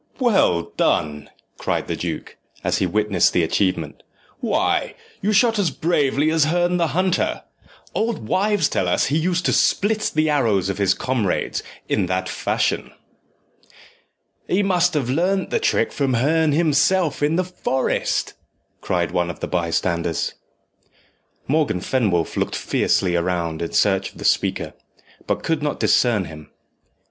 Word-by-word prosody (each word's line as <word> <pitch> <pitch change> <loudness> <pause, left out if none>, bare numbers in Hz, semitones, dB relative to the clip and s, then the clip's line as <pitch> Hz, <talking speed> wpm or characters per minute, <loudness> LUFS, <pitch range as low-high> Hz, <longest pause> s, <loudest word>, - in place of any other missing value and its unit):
"Well 190 - +2
done!" 75 -1 0 0.3
cried - - -1
the - - -3
duke, - - -5 0.3
as - - 0
he 95 - +1
witnessed 105 -1 +2
the 90 - +2
achievement; 95 +3 -1 0.4
"why, - - 0 0.3
you 210 - +1
shoot 225 +1 +3
as 190 -5 +2
bravely 150 -1 +1
as 160 -2 +3
Herne 175 +2 +1
the 170 -1 +1
Hunter. 185 -1 0 0.5
Old 220 - -2
wives 200 - +2
tell 90 - -1
us 90 - +2
he 145 - 0
used 180 +2 0
to - - +2
split 215 +2 +1
the 155 0 +2
arrows 115 -11 +1
of 100 0 -3
his 100 -1 +3
comrades 120 -8 -1 0.3
in 90 - 0
that 95 0 -1
fashion." - - -1 1.5
"He 195 +3 +1
must 180 -3 +2
have 140 -5 0
learnt 185 +7 0
the 470 - +1
trick 460 - +1
from 135 -3 0
Herne 155 +5 +2
himself 160 +1 +2
in 150 +2 +2
the 185 - +2
forest," 175 -7 -1 0.5
cried 85 -1 -1
one 90 -1 0
of 85 - -7
the - - -3
bystanders. 85 -1 -1 1.1
Morgan 150 - +1
Fenwolf 95 -7 0
looked - - -1
fiercely 90 -2 +1
round 85 -2 -1
in 85 - -4
search 95 -2 +1
of - - -17
the - - -7
speaker, - - 0 0.5
but - - -1
could 160 -2 0
not 150 -1 -2
discern 115 -6 +2
him. 75 -2 -11
140 Hz, 150 wpm, -21 LUFS, -, 1.5 s, shoot